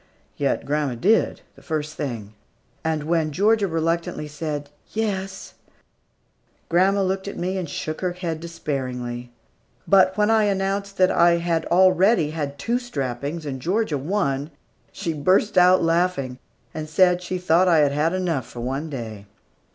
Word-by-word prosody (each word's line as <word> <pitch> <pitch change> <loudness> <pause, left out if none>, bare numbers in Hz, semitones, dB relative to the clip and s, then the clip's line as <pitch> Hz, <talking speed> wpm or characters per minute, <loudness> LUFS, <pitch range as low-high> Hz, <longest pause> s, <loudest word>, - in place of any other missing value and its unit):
Yet 140 -1 -1
grandma 145 -3 -1
did, 205 - +2
the - - -17
first 155 -1 -3
thing. 115 -9 -5 0.5
And 160 -2 -1
when 160 -1 0
Georgia 205 +5 +2
reluctantly 165 -2 -1
said, 145 -1 -5 0.2
"Yes," 195 -3 -3 1.2
grandma 195 +3 +3
looked 190 +1 -2
at 200 - -6
me 185 +2 -2
and 180 -5 -3
shook 155 +1 -4
her 180 -1 -1
head 170 -3 -4
despairingly; 125 -7 -4 0.6
but 190 0 +5
when 210 +1 +3
I 220 -1 +4
announced 195 0 -1
that 185 0 +4
I 170 0 +5
had 170 -1 0
already 185 -1 +4
had 145 -3 -4
two 235 +11 0
strappings, 145 - -4
and 135 -3 -5
Georgia 180 - 0
one, 145 -3 -1 0.4
she 165 - -3
burst 185 +8 +2
out 180 0 +6
laughing, 165 -7 0 0.3
and 155 -1 -5
said 180 +2 +4
she 185 +1 -3
thought 180 +1 +3
I 170 -2 +5
had 140 - +1
had 150 +3 +1
enough 170 -9 -1
for 120 - -8
one 135 +6 -3
day. 110 -7 -7
165 Hz, 150 wpm, -23 LUFS, 145-185 Hz, 1.2 s, out